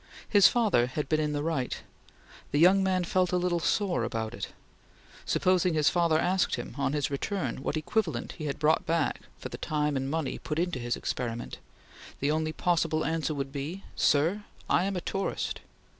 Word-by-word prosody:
His 200 -2 +7
father 205 - +3
had 140 +3 -3
been 155 +1 +2
in 150 -1 0
the 145 0 -1
right. 155 -6 -1 0.7
The 145 - 0
young 185 +5 +6
man 185 -1 +1
felt 180 +1 +1
a 180 - +2
little 175 -1 +1
sore 190 +2 +1
about 110 0 -3
it. - - -4 0.8
Supposing 180 -2 +2
his 150 -2 +4
father 170 -3 +3
asked 180 +3 +2
him, 120 - -6
on 140 0 0
his 145 -2 0
return, 140 - -2
what 145 - -2
equivalent 160 - -1
he 155 - -7
had 140 - -2
brought 155 +1 +2
back 165 -2 0 0.2
for - - -7
the - - -8
time 150 -1 0
and 135 0 -1
money 155 -2 -2
put 150 - -4
into 175 -5 0
his 120 0 -1
experiment! 120 -1 -4 0.6
The 140 +2 +1
only 155 0 0
possible 165 -2 +1
answer 160 -1 -1
would 135 -1 -3
be: 150 +7 -5
"Sir, 165 +8 +2 0.2
I 180 - +3
am 195 0 -1
a 180 - -2
tourist!" 195 +3 -2
155 Hz, 190 wpm, -29 LUFS, 140-180 Hz, 0.8 s, His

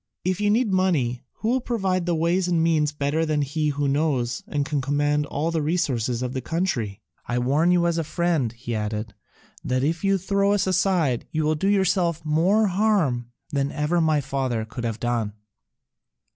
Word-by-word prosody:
If 185 +2 0
you 205 - +2
need 220 -1 +2
money, 150 -11 +1
who 220 - -3
will 255 +2 +2
provide 190 -7 -1
the 175 - +2
ways 170 +3 +1
and 170 -2 +2
means 155 -3 +2
better 150 +2 -1
than 155 -2 +1
he 150 +2 -1
who 145 0 -1
knows 135 -4 0
and 145 -1 -1
can 145 -1 -1
command 145 +2 0
all 155 +4 -2
the 165 -1 0
resources 130 -7 0
of 125 0 -3
the 130 - -3
country? 120 - -2 0.2
I 120 - -1
warn 140 +7 +2
you 175 -1 +3
as 170 -1 +1
a - - 0
friend," 165 -7 0
he 120 0 -6
added, 105 0 -3 0.5
"that 130 0 0
if 165 +5 -1
you 195 0 +3
throw 200 +2 +1
us 205 -1 +1
aside 180 -8 +1
you 155 0 -1
will 155 +1 +2
do 155 +5 -1
yourself 185 -5 +1
more 180 +8 +3
harm 180 - +1 0.2
than 140 -1 0
ever 155 +4 0
my 155 -2 +2
father 130 -5 -2
could 120 +2 -6
have 115 -1 -3
done." 120 -4 -1
155 Hz, 190 wpm, -24 LUFS, 130-180 Hz, 0.5 s, you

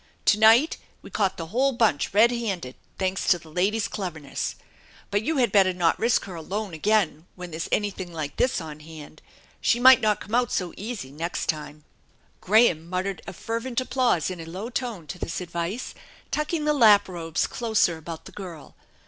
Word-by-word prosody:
To 210 - +4
night 225 +8 +6 0.3
we - - -12
caught 195 -3 0
the 165 - -4
whole 270 +3 +2
bunch 225 -11 +1
red 220 +4 +5
handed, 195 - -3 0.2
thanks 190 0 -1
to 180 - +5
the 160 -2 -15
lady's 200 +6 +1
cleverness. 160 -8 -4 0.6
But 205 0 +2
you 310 +7 -1
had 245 -3 +2
better 190 -3 +4
not 175 -2 +1
risk 230 +1 +2
her 190 - -8
alone 190 +4 -4
again 175 -2 +1
when 180 -1 -8
there's 160 +2 -4
anything 195 -4 -1
like 155 -3 -5
this 255 - +2
on 155 -2 -8
hand. 155 0 -12 0.4
She 240 - +2
might 260 +1 +8
not 210 -2 +2
come 210 - -10
out 245 -1 +2
so 180 -2 -2
easy 205 - -6
next 165 +4 -4
time! 150 -1 -3 0.3
" - - -37
Graham 185 -6 +3
muttered 185 +1 -2
a - - -6
fervent 230 +6 -3
applause 255 - +1
in 180 - -7
a - - -8
low 190 +8 -6
tone 235 -9 -4
to 150 +5 -8
this - - -3
advice, 175 +6 -4 0.4
tucking 300 +1 -1
the 300 - +3
lap 215 -7 +6
robes 165 -3 -2
closer 220 -7 +1
about 160 0 -8
the - - -10
girl. 175 -7 -10
190 Hz, 190 wpm, -25 LUFS, 165-230 Hz, 0.6 s, might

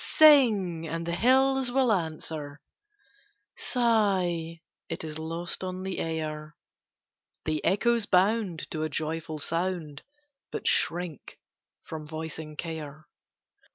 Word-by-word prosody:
Sing, 215 - +5
and 165 +1 -3
the 170 - -2
hills 265 +4 +3
will 260 -2 +3
answer; 155 -5 -2 1.0
Sigh, 190 -9 +1 0.3
it - - -2
is 155 -1 -3
lost 165 +3 -3
on 185 0 -4
the 190 -1 -3
air; 155 -1 -4 0.9
The 155 -1 -1
echoes 230 +2 +2
bound 190 -2 +2
to 155 - -3
a 155 - -1
joyful 155 +1 -3
sound, 165 -2 -2 0.5
But - - -5
shrink 175 -3 0 0.5
from 155 -1 -7
voicing 155 0 -5
care. 155 -2 -6
165 Hz, 110 wpm, -28 LUFS, 155-200 Hz, 1.0 s, Sing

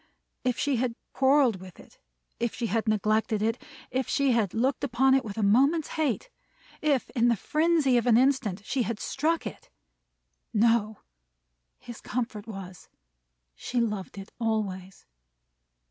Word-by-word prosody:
If 250 -2 0
she 280 -3 0
had 240 -1 -1 0.2
quarreled 265 -5 +3
with 185 -2 -12
it; - - -17 0.4
if 235 -1 -1
she 240 - -3
had 225 +1 -1
neglected 215 +1 +1
it; 225 +2 -1 0.3
if 260 -1 -1
she 280 -2 +2
had 225 -6 +1
looked 255 +4 0
upon 265 +3 +3
it 270 0 +3
with 210 -3 -7
a 220 - 0
moment's 275 +10 +3
hate! 315 - -2 0.5
if, 290 -4 +1
in 240 -1 +2
the 235 - +4
frenzy 305 - +2
of 240 - 0
an 230 -2 +6
instant, 245 -7 +1
she 260 0 -1
had 230 -2 -2
struck 320 +4 -1
it! - - -8 0.9
No! 220 -1 +2 0.8
His 240 -1 -11
comfort 230 -4 -4
was, 190 -4 -9 0.6
She 240 - -3
loved 210 -5 -2
it 195 0 -9
always. 200 -5 -3
235 Hz, 150 wpm, -27 LUFS, 215-265 Hz, 0.9 s, an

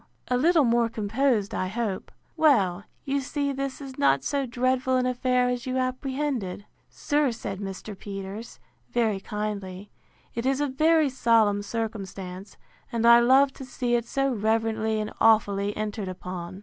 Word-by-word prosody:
A 250 - +2
little 320 +4 +4
more 235 -1 +2
composed, 220 0 0
I 185 - -1
hope. 210 -1 -3 0.2
Well, 205 - +3 0.2
you 275 0 0
see 280 +1 -2
this 275 0 -4
is 270 -2 -9
not 135 0 +3
so 280 -2 -1
dreadful 255 +1 +1
an 250 - +1
affair 250 0 +1
as 250 +1 -2
you 255 0 -1
apprehended. 255 -6 -2 0.2
Sir, 290 -3 0
said 195 -4 -6
Mr. 195 +1 -6
Peters, 195 +3 -7 0.3
very 220 -4 +1
kindly, 200 -1 -5 0.4
it 230 - -3
is 270 0 +1
a 290 - +2
very 310 +2 +3
solemn 225 -5 +3
circumstance; 200 -3 -5 0.3
and 230 -1 0
I 235 0 +9
love 265 +3 +5
to - - -9
see 250 -1 -2
it 235 -1 +1
so 275 0 0
reverently 220 0 0
and 215 0 -4
awfully 205 -2 +3
entered 210 -1 -3
upon. 185 0 -6
230 Hz, 155 wpm, -26 LUFS, 205-260 Hz, 0.4 s, I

